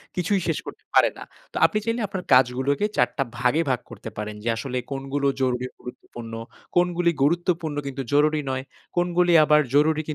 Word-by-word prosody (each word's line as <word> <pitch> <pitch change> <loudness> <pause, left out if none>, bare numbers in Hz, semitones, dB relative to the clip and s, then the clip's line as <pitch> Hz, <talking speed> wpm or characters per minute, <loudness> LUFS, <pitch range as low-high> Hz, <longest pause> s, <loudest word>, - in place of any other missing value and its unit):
কিছুই 185 +3 +1
শেষ - - 0
করতে - - -9
পারে - - +6
না। - - -8 0.3
তো - - -4
আপনি 215 - +1
চাইলে 230 +1 -1
আপনার 185 -1 -5
কাজগুলোকে 130 +7 +3
৪টা 135 - +2
ভাগে 125 +7 +2
ভাগ 125 - +1
করতে - - -8
পারেন 105 0 -4
যে 115 - -1
আসলে 125 +2 -3
কোনগুলো 135 +1 -1
জরুরি 125 -1 0
গুরুত্বপূর্ণ, 120 -2 -10 0.4
কোনগুলি 175 -1 +3
গুরুত্বপূর্ণ 170 0 0
কিন্তু 135 0 -4
জরুরি 150 +1 +3
নয়, 130 0 -2 0.3
কোনগুলি 175 0 +3
আবার 150 0 +5
জরুরি 155 +1 +4
145 Hz, 165 wpm, -24 LUFS, 130-175 Hz, 0.4 s, পারে